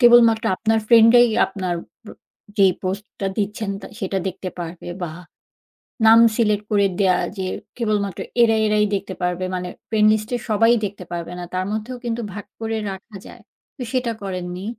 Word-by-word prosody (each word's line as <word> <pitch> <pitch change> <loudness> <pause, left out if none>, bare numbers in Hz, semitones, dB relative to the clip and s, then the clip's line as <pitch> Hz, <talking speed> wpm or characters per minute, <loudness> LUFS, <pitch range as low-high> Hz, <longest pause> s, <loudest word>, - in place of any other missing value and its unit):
কেবলমাত্র 235 -2 +6
আপনার 225 0 +1
friend 230 -1 +7
রাই 240 0 +7 0.2
আপনার 185 -3 -3 0.3
প - - -21 0.5
যেই 195 -2 +5
post 190 +3 -3 0.2
টা 195 - 0
দিচ্ছেন 210 0 -2
তা - - -9
সেটা 195 -2 -2
দেখতে 185 0 -6
পারবে 170 0 -7
বা 165 -3 -3 0.9
নাম 225 +1 +8 0.2
select 210 -3 +2
করে 200 -1 +3
দেয়া 185 -2 +4 0.2
যে, 190 - -2 0.3
কেবলমাত্র 210 -5 -1 0.2
এরা, 225 -1 +4
এরাই 210 0 +3
দেখতে 195 -1 -3
পারবে, 180 +1 -1
মানে 180 0 -3 0.2
friend 215 -1 +4
list 215 0 -1
এ - - -4
সবাই 225 +2 +4
দেখতে 200 -2 -5
পারবে 170 0 -5
না। 175 - -5
তার 185 0 0
মধ্যেও 220 +4 -4
কিন্তু 235 0 -2
ভাগ 205 0 -7 0.2
করে 225 0 -2
রাখা 195 +2 -9
যায়, - - -13 0.3
তো 260 - -6
সেটা 250 -3 0
করেননি? 180 -1 -5
205 Hz, 175 wpm, -21 LUFS, 185-225 Hz, 0.9 s, নাম